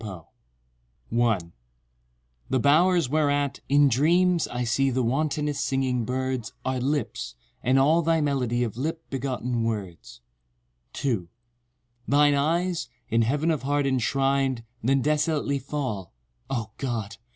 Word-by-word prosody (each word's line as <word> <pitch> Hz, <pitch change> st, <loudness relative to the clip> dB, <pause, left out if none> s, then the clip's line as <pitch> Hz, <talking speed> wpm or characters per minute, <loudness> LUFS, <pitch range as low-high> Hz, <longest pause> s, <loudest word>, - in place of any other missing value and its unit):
TO 95 Hz, -7 st, -7 dB, 0.4 s
—— -, -, -42 dB
1 110 Hz, -8 st, +1 dB, 1.0 s
The 130 Hz, -, +2 dB
bowers 165 Hz, +4 st, +4 dB
whereat, 145 Hz, -1 st, +1 dB
in 145 Hz, +1 st, +5 dB
dreams, 170 Hz, +7 st, +3 dB
I 125 Hz, 0 st, -3 dB
see 135 Hz, +4 st, +2 dB
The 130 Hz, 0 st, 0 dB
wantonest 145 Hz, +3 st, 0 dB
singing 130 Hz, -3 st, 0 dB
birds 130 Hz, -2 st, -2 dB
Are 130 Hz, -1 st, 0 dB
lips—and 125 Hz, -, -2 dB
all 155 Hz, +5 st, +4 dB
thy 165 Hz, 0 st, +2 dB
melody 130 Hz, -5 st, 0 dB
Of 115 Hz, -2 st, -4 dB
lip 160 Hz, +5 st, -3 dB
begotten 125 Hz, -3 st, -2 dB
words— 95 Hz, -, -5 dB, 0.7 s
2 110 Hz, -11 st, -2 dB, 0.8 s
Thine 145 Hz, +1 st, +4 dB
eyes, 165 Hz, +1 st, 0 dB, 0.2 s
in 115 Hz, +1 st, +3 dB
Heaven 145 Hz, +8 st, +1 dB
of 155 Hz, -, -1 dB
heart 145 Hz, +2 st, 0 dB
enshrin'd 135 Hz, -1 st, +1 dB, 0.2 s
Then 135 Hz, +2 st, +2 dB
desolately 150 Hz, -1 st, +1 dB
fall, 130 Hz, -, -4 dB, 0.4 s
O! 115 Hz, -5 st, -3 dB
God! 115 Hz, -5 st, -3 dB
135 Hz, 125 wpm, -26 LUFS, 115-145 Hz, 1.0 s, in